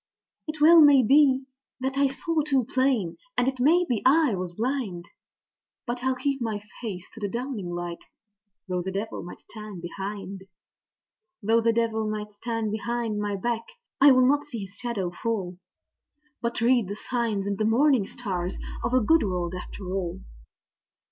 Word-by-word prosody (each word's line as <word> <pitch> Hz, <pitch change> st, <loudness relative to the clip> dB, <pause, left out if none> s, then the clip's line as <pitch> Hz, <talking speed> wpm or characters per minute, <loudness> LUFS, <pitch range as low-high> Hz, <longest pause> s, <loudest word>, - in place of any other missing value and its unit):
It 310 Hz, 0 st, -5 dB
well 325 Hz, +2 st, +8 dB
may 285 Hz, -3 st, +7 dB
be 270 Hz, +2 st, +5 dB, 0.4 s
that 265 Hz, +1 st, -2 dB
I 280 Hz, 0 st, +4 dB
saw 320 Hz, +4 st, -1 dB
too 275 Hz, -5 st, +1 dB
plain, 255 Hz, -10 st, +1 dB, 0.2 s
and 245 Hz, -, +2 dB
it 265 Hz, -1 st, -1 dB
may 335 Hz, +7 st, +4 dB
be 235 Hz, -5 st, 0 dB
I 290 Hz, -1 st, +4 dB
was 180 Hz, -2 st, -3 dB
blind; 225 Hz, -7 st, -2 dB, 0.8 s
But 245 Hz, 0 st, -4 dB
I'll 260 Hz, 0 st, +1 dB
keep 270 Hz, +1 st, -1 dB
my 220 Hz, -3 st, -2 dB, 0.2 s
face 195 Hz, -7 st, -5 dB
to 225 Hz, -, -10 dB
the 205 Hz, -2 st, -2 dB
dawning 235 Hz, -5 st, -4 dB
light, 175 Hz, 0 st, -5 dB, 0.6 s
though 180 Hz, -1 st, -1 dB
the 190 Hz, +2 st, -4 dB
devil 200 Hz, +3 st, -4 dB
may 175 Hz, -, -8 dB
stand 210 Hz, -5 st, -10 dB
behind! 195 Hz, +1 st, -6 dB, 1.0 s
Though 225 Hz, +3 st, +3 dB
the 230 Hz, 0 st, +3 dB
devil 225 Hz, -1 st, 0 dB
may 215 Hz, 0 st, -3 dB
stand 225 Hz, -1 st, -2 dB
behind 225 Hz, 0 st, -2 dB
my 205 Hz, -1 st, -1 dB
back, 230 Hz, +3 st, -2 dB, 0.4 s
I'll 260 Hz, -2 st, +7 dB
not 290 Hz, +2 st, +3 dB
see 240 Hz, -7 st, -6 dB
his 190 Hz, -, -14 dB
shadow 205 Hz, -5 st, -3 dB
fall, 185 Hz, -2 st, -3 dB, 0.8 s
But 235 Hz, -1 st, -2 dB
read 240 Hz, -3 st, +3 dB
the 200 Hz, -, -4 dB
signs 225 Hz, -4 st, -2 dB
in 200 Hz, -1 st, -2 dB
the 215 Hz, -, 0 dB
morning 240 Hz, -1 st, +3 dB
stars 185 Hz, -6 st, -4 dB, 0.3 s
of 240 Hz, +2 st, 0 dB
a 255 Hz, -, +5 dB
good 320 Hz, +8 st, +4 dB
world 180 Hz, -3 st, -2 dB
after 185 Hz, +2 st, -7 dB
all. 185 Hz, -1 st, -3 dB
230 Hz, 170 wpm, -26 LUFS, 195-260 Hz, 1.0 s, well